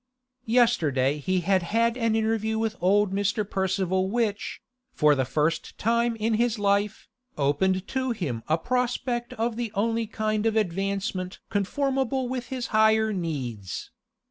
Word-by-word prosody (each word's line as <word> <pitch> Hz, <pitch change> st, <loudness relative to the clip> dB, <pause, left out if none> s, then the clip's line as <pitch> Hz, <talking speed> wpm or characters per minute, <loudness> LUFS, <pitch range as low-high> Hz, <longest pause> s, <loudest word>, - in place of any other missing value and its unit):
Yesterday 155 Hz, -, +2 dB
he 185 Hz, +5 st, 0 dB
had 190 Hz, +2 st, +2 dB
had 230 Hz, +6 st, +1 dB
an 230 Hz, -3 st, +1 dB
interview 220 Hz, 0 st, 0 dB
with 220 Hz, 0 st, -1 dB
old 195 Hz, +1 st, +3 dB
Mr. 205 Hz, +1 st, 0 dB
Percival 190 Hz, -1 st, 0 dB
which, 215 Hz, -2 st, -1 dB, 0.3 s
for 150 Hz, -1 st, +4 dB
the 135 Hz, -2 st, +1 dB
first 155 Hz, +5 st, -1 dB
time 235 Hz, +1 st, +1 dB
in 225 Hz, +1 st, 0 dB
his 235 Hz, +1 st, +1 dB
life, 200 Hz, 0 st, 0 dB, 0.3 s
opened 185 Hz, +7 st, +1 dB
to 260 Hz, -1 st, -1 dB
him 160 Hz, -, -2 dB
a 160 Hz, -, +2 dB
prospect 245 Hz, +3 st, -1 dB
of 225 Hz, 0 st, -2 dB
the 235 Hz, -3 st, -3 dB
only 225 Hz, +2 st, 0 dB
kind 215 Hz, 0 st, -1 dB
of 225 Hz, -, 0 dB
advancement 195 Hz, -2 st, -1 dB
conformable 265 Hz, +4 st, 0 dB
with 250 Hz, -1 st, -4 dB
his 255 Hz, -2 st, -4 dB
higher 220 Hz, 0 st, +4 dB
needs. 130 Hz, -, -4 dB
210 Hz, 145 wpm, -26 LUFS, 185-230 Hz, 0.3 s, for